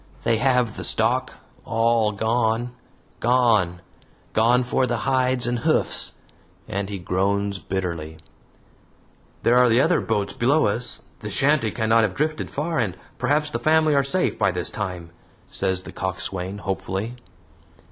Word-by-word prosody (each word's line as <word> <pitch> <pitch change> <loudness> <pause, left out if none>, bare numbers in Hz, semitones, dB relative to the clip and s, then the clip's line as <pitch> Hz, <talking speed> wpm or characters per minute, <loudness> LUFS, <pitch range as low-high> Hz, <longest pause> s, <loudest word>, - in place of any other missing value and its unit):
They 115 - +2
have 125 -2 +1
the - - -5
stock 120 +4 +2 0.3
all 115 -1 +2
gone 115 +2 0 0.5
gone, 110 -8 +2 0.5
gone 120 +3 +3
for 125 +1 +1
the 120 - -1
hides 130 -1 +1
and 120 0 -1
hoofs," - - 0 0.5
and 100 0 -3
he 100 - -4
groans 100 +2 -1
bitterly. 85 -4 -4 1.3
"There 120 +1 +5
are 125 - +6
other 165 +5 +3
boats 105 -3 -1
below 140 +6 +2
us. 115 +4 -2 0.2
The 105 - -6
shanty 135 +2 +2
cannot 115 0 +2
have 105 -4 0
drifted 155 +1 -2
far, 160 +1 -2
and 95 -6 -1 0.2
perhaps 150 +1 +1
the 115 - -2
family 155 +3 +3
are 140 -1 +3
safe 180 +7 0
by 100 -2 +3
this 90 -3 0
time," 90 -5 -5 0.3
says 95 -1 0
the - - -9
coxswain, 95 0 -3
hopefully. 100 +4 -4
115 Hz, 140 wpm, -23 LUFS, 95-125 Hz, 1.3 s, are